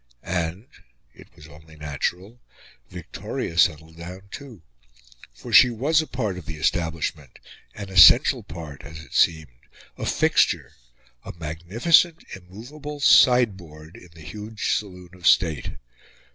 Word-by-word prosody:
And 90 +3 -4 0.5
it - - -17
was 75 - -15
only 80 +1 -17
natural 85 - -5 0.5
Victoria 85 - -7
settled 80 -4 +1
down 90 +4 -11
too. 125 - -11 0.7
For - - -10
she 125 - +8
was 140 +7 +1
a 155 - -8
part 105 -7 -4
of 80 - -14
the 85 - -6
establishment 80 -4 -3 0.4
an 100 -2 -8
essential 90 -4 +6
part 75 -5 -10
as 80 +2 -11
it - - -16
seemed 75 -7 0 0.3
a - - -4
fixture - - +1 0.5
a - - -9
magnificent, 95 - +1
immovable 125 +12 -10
sideboard 95 - +2
in 90 - -15
the 80 - -14
huge 105 +6 -4
saloon 90 -4 -7
of 90 -1 -4
state. 80 -5 +2
90 Hz, 130 wpm, -23 LUFS, 80-110 Hz, 0.7 s, she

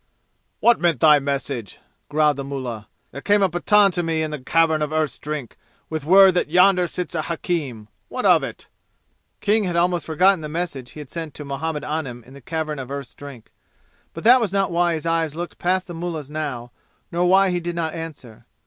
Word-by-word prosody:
"What 235 0 +5
meant 170 -6 +1
thy 150 +1 +6
message?" 135 -6 -4 0.3
growled 150 -1 +2
the 140 - -4
mullah. 125 -6 -6 0.2
"There 140 - -8
came 205 +3 +3
a 190 - +3
Pathan 200 +4 +4
to 175 - -1
me 165 -2 -1
in 155 - -3
the 150 - -4
Cavern 160 +3 +2
of 150 0 -1
Earth's 155 -2 -1
Drink 150 -5 -6 0.3
with 155 -2 -3
word 190 +3 +7
that 175 - 0
yonder 180 +1 +4
sits 180 +1 -5
a 160 - -1
hakim. 150 - -3 0.2
What - - -4
of - - +6
it?" - - -7 0.7
King 210 0 +2
had 175 -2 -2
almost 175 0 +1
forgotten 180 +3 +3
the 150 - -6
message 150 -6 -4
he 150 - -8
had 145 - -12
sent 165 -3 -6
to 150 - -7
Muhammad 150 +2 -3
Anim 145 -6 -4
in 130 - -16
the 140 - -13
Cavern 155 +1 -4
of 130 -1 -7
Earth's 140 -2 -6
Drink. 140 -5 -12 0.6
But 165 - -7
that 250 +3 +7
was 215 -5 -1
not 195 -2 0
why 170 0 +2
his 160 - -6
eyes 165 -2 0
looked 175 +1 -6
past 185 +1 +1
the 175 - -8
mullah's 165 -4 -5
now, 140 -6 -4 0.4
nor 175 +1 +1
why 190 +1 +4
he 175 - 0
did 175 0 -4
not 160 -2 -2
answer. 155 -9 -9
160 Hz, 210 wpm, -22 LUFS, 140-175 Hz, 0.7 s, word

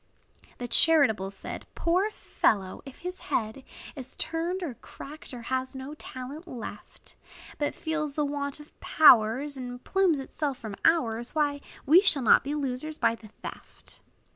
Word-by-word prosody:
The 245 - -5
charitable 240 -10 +5
said, 195 -1 -8
"Poor 365 +5 +2
fellow! 195 - 0
if 270 - -11
his 360 +1 -5
head 220 +4 -1 0.3
Is 260 -2 -9
turned, 340 +3 -2
or 300 -7 -3
cracked, 295 +6 -11
or 245 -2 -8
has 260 +2 -2
no 265 +2 -6
talent 290 +3 -8
left; 230 -7 -9 0.4
But 290 - -1
feels 310 -3 -3
the 300 - +1
want 285 0 -3
of 295 - -16
powers, 265 0 +5
And 245 -1 -7
plumes 380 -5 +2
itself 275 0 -3
from 220 -5 -7
ours, 240 -7 +2
Why, 290 -2 +1 0.2
we 325 +7 +7
shall 320 -9 +2
not 225 - +6
be 285 +2 -3
losers 290 +2 -3
by - - +3
the 225 -1 -11 0.2
theft." - - -11
280 Hz, 155 wpm, -28 LUFS, 245-310 Hz, 0.4 s, we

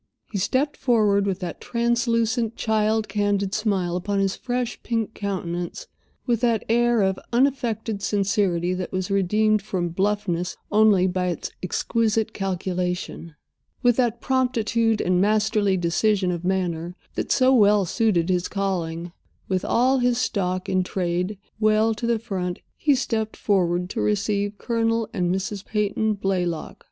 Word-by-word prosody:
He 200 - -2
stepped 265 +9 0
forward, 210 -5 +2
with 195 0 -2
that 175 -2 -5
translucent, 235 -1 0
child 220 0 +1
candid 205 -1 0
smile 195 -5 0
upon 200 +3 -2
his 195 -1 +1
fresh, 245 -1 -3
pink 225 -2 -2
countenance, 180 - -4 0.4
with 235 -3 +1
that 235 -3 +1
air 235 -1 +3
of 190 0 0
unaffected 235 -5 0
sincerity 195 -3 +1
that 185 -1 -4
was 185 +1 -2
redeemed 210 +2 +2
from 185 -4 -2
bluffness 185 -1 -1
only 210 -3 +5
by 180 0 0
its 175 -3 -3
exquisite 220 +3 0
calculation, 180 -3 -3 0.5
with 245 -1 +5
that 240 -3 +1
promptitude 230 -4 +1
and 180 0 +2
masterly 210 -1 +2
decision 185 +2 +1
of 170 -1 -4
manner 175 -2 -1 0.2
that - - -3
so 260 0 +4
well 205 -4 +5
suited 185 -3 +1
his 180 -1 +1
calling—with 180 -1 -4
all 260 +2 +2
his 245 -1 +2
stock 185 -6 -1
in 185 -1 +2
trade 180 +2 -2 0.2
well 215 +1 +3
to 235 +2 -4
the 235 -1 +2
front; 185 -5 -3 0.2
he 290 -2 +2
stepped 220 -4 -2
forward 180 -3 +1
to - - -2
receive 205 0 0
Colonel 230 -1 0
and 180 -2 0
Mrs. 190 +1 -3
Peyton 210 0 0
Blaylock. 180 -4 -2
205 Hz, 140 wpm, -24 LUFS, 185-225 Hz, 0.5 s, only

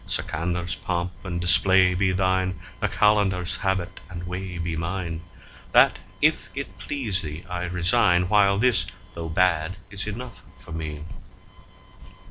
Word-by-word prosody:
Sikandar's3 85 +1 -2
pomp 85 0 -2
and 85 -2 -3
display 90 +1 +5
be 95 +1 +2
thine, 95 0 +1 0.2
the - - +1
Qalandar's4 100 -4 +2
habit 95 -2 -1
and 85 -1 -7
way 90 0 -5
be 85 -1 -3
mine; 85 0 -3 0.5
That, - - +6 0.2
if - - +2
it - - -6
please 115 -10 -1
thee, 75 0 -7
I 90 0 -3
resign, 90 0 +3
while 100 0 +4
this, 120 +1 +3 0.3
though 85 -1 -5
bad, 90 +1 +1
is 100 +1 -3
enough 115 +1 -6 0.2
for - - -12
me. 75 -2 -5
90 Hz, 135 wpm, -25 LUFS, 85-95 Hz, 0.5 s, That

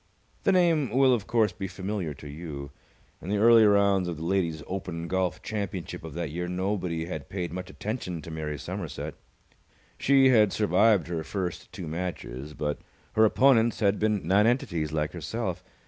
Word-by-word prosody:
The - - +5
name 170 -7 +3
will, 130 +3 +4
of 110 -4 -1
course, 110 -4 +2
be 95 - -5
familiar 95 -5 -4
to 75 - -11
you. 70 -2 -7 0.5
In 90 - -7
the 105 - +1
early 115 +1 +7
rounds 100 -2 +4
of 85 -3 -4
the 80 - -6
Ladies' 85 -4 0
Open 90 -3 -5
Golf 95 0 -1
Championship 100 -7 -4
of 80 -2 -8
that 85 -3 -3
year 90 +2 -3
nobody 90 -2 -2
had 80 -5 -6
paid 90 -3 -4
much 90 0 -5
attention 95 -4 -4
to 80 - -8
Mary 75 -2 -4
Somerset. - - -5 0.9
She 135 -1 +5
had 110 -5 +5
survived 105 0 +3
her 85 -2 -3
first 90 -1 -4
two 90 - -7
matches, 75 -4 -5
but 75 -1 -2 0.3
her 110 0 +5
opponents 120 0 +4
had 100 -1 +2
been 105 -2 0
nonentities 100 - +2
like 75 -1 -1
herself. - - -4
95 Hz, 170 wpm, -27 LUFS, 80-105 Hz, 0.9 s, early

